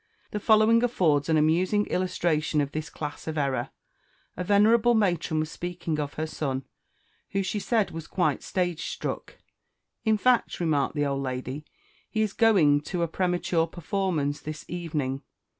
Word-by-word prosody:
The 210 - -2
following 220 +2 +5
affords 165 - +2
an 160 - +4
amusing 180 +7 +2
illustration 170 -4 0
of 140 -1 0
this 155 0 -4
class 150 0 -6
of 160 0 -3
error: 140 -3 0 0.7
A 180 - -3
venerable 220 +5 +4
matron 175 -6 +1
was 155 - -4
speaking 175 -3 -4
of 145 -1 -3
her 155 - -2
son, 135 -4 -3 0.7
who, 195 0 +1
she 200 +3 -2
said, 220 0 +1
was 165 -1 -7
quite 180 - 0
stage 175 -3 -2
struck. - - -5 0.7
"In 220 -2 +3
fact," 250 +2 +2
remarked 155 -4 +1
the 145 -1 +1
old 140 -1 -1
lady, 130 +2 -4 0.4
"he 220 -1 +1
is 210 -3 -2
going 175 -11 +4
to 175 -2 -1
a - - +1
premature 175 -1 0
performance 170 -4 -1
this 155 0 -7
evening!" 150 -6 -3
170 Hz, 160 wpm, -27 LUFS, 150-195 Hz, 0.7 s, following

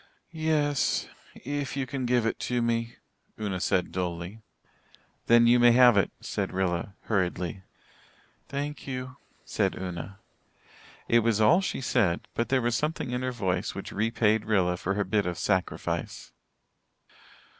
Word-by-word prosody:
"Yes 155 -3 +1 0.3
if 145 +1 -4
you 135 - 0
can 130 -1 -3
give 120 -2 +2
it 115 - -1
to 125 0 +1
me," 115 0 -1 0.4
Una 100 -4 -2
said 90 -1 0
dully. 90 +3 -4 0.9
"Then 120 0 +6
you 120 +1 +5
may 120 -1 +7
have 125 -1 +7
it," 100 - +3
said - - -3
Rilla 95 0 -1
hurriedly. 90 -3 -1 0.9
"Thank 145 +1 -4
you," 130 -1 -5 0.3
said - - 0
Una. 90 +2 -6 0.9
It 120 - +5
was 115 -2 +1
all 160 - +5
she 185 - -3
said, 105 -10 +1
but 115 - -1
there 130 -2 +2
was 120 0 +1
something 150 -4 -2
in 125 0 -2
her 130 0 -1
voice 95 -5 -2
which 100 - -6
repaid 110 0 +1
Rilla 95 -5 +2
for 95 +2 -2
her 105 - +1
bit 100 0 0
of 90 -1 -3
sacrifice. 95 -1 -2
115 Hz, 145 wpm, -27 LUFS, 95-125 Hz, 0.9 s, may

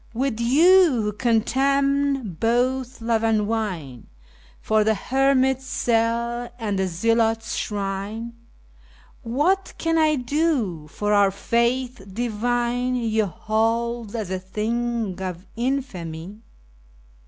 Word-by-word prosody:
With 250 -2 -1
you, 305 - +5
who 210 0 -1
contemn 270 +1 +1
both 250 +2 0
love 225 -1 0
and 220 -1 +2
wine2 190 - -3 0.5
for 215 0 +2
the 220 +1 +2
hermit's 265 +3 +1
cell 235 0 0
and 210 -5 -2
the 190 - +1
zealot's 225 +5 +1
shrine, 205 +3 -4 0.9
What 300 +11 0
can 330 0 +1
I 310 -1 +4
do, 250 - -1
for 205 +6 -1
our 200 -1 +5
Faith 235 +4 0
divine 240 +3 -1
you 220 -3 0
hold 225 +4 -1
as 215 -5 -4
a 185 - -1
thing 215 0 -2
of 180 -1 -5
infamy? 210 -8 -4
230 Hz, 110 wpm, -23 LUFS, 210-255 Hz, 0.9 s, you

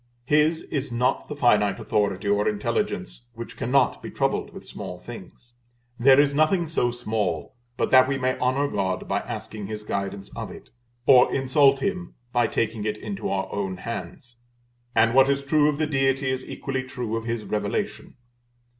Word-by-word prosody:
His 150 +3 +3
is 140 -3 -3
not 120 +2 0
the 150 - -6
finite 105 -7 +3
authority 100 -1 -1
or 100 0 +2
intelligence - - -3
which - - -8
cannot - - +1
be - - -7
troubled - - -1
with - - -11
small 90 - -7
things. 120 +4 -12 0.5
There 130 +3 +6
is 145 -1 +4
nothing 160 +4 +2
so 125 -6 +1
small 110 -9 -2 0.2
but - - 0
that 130 0 +7
we 135 0 0
may 130 0 0
honor 130 +3 +1
God 95 -5 -2
by - - 0
asking 105 -2 -6
His 105 0 -6
guidance 100 -1 -4
of - - -5
it, - - -12 0.3
or 125 -2 +6
insult 135 +1 +3
Him 180 -1 -3 0.2
by 120 -1 +3
taking 110 -1 -1
it 105 0 -2
into 100 -2 -5
our 95 -1 -1
own 95 -2 -2
hands; 120 +3 -7 0.6
and 115 +1 +4
what 135 +1 +6
is 140 0 +1
true 150 +1 +3
of 145 - -1
the 155 - +1
Deity 135 -2 +1
is 130 0 -3
equally 135 -1 -4
true 125 -3 -4
of 115 0 -4
His 115 -2 -2
Revelation. 105 +3 -3
120 Hz, 175 wpm, -25 LUFS, 105-135 Hz, 0.6 s, that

